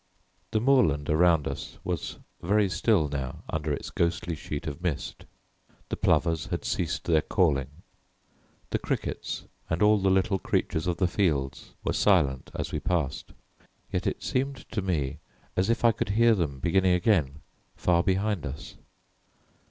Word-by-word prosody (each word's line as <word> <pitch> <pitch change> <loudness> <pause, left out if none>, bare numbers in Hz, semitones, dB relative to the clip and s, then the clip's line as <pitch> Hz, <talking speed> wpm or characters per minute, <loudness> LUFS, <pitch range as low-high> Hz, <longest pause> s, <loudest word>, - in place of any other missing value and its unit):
The 110 - +1
moorland 105 - +3
around 80 -1 +4
us - - -6
was - - -3 0.2
very 100 +3 +3
still 95 -4 +2
now 70 -2 -5
under 75 -1 -2
its 70 - -4
ghostly 85 0 0
sheet 75 +1 -5
of 80 +1 -5
mist. 90 -6 -3 0.6
The - - -1
plovers 80 -2 +1
had - - -3
ceased - - -1
their 80 -2 +3
calling; 75 -10 +1 1.0
the - - +1
crickets - - -3 0.2
and 80 +4 +1
all 105 0 +5
the 95 0 +2
little 95 +1 +2
creatures 80 -1 -1
of 90 - 0
the 95 - +2
fields 75 -8 -1
were - - 0
silent 65 -2 +2
as - - -3
we - - -1
passed, 85 -7 -2 0.6
yet - - -1
it - - -2
seemed 135 +1 -2
to 110 - -1
me 75 -6 -1 0.4
as 95 +3 +1
if 115 +1 +1
I 115 - +7
could 115 -1 -3
hear 115 +3 +5
them 80 -9 -1
beginning 90 +5 +3
again 80 -7 +1 0.3
far 85 -1 +2
behind 100 0 0
us. 70 0 -7
85 Hz, 155 wpm, -27 LUFS, 75-100 Hz, 1.0 s, I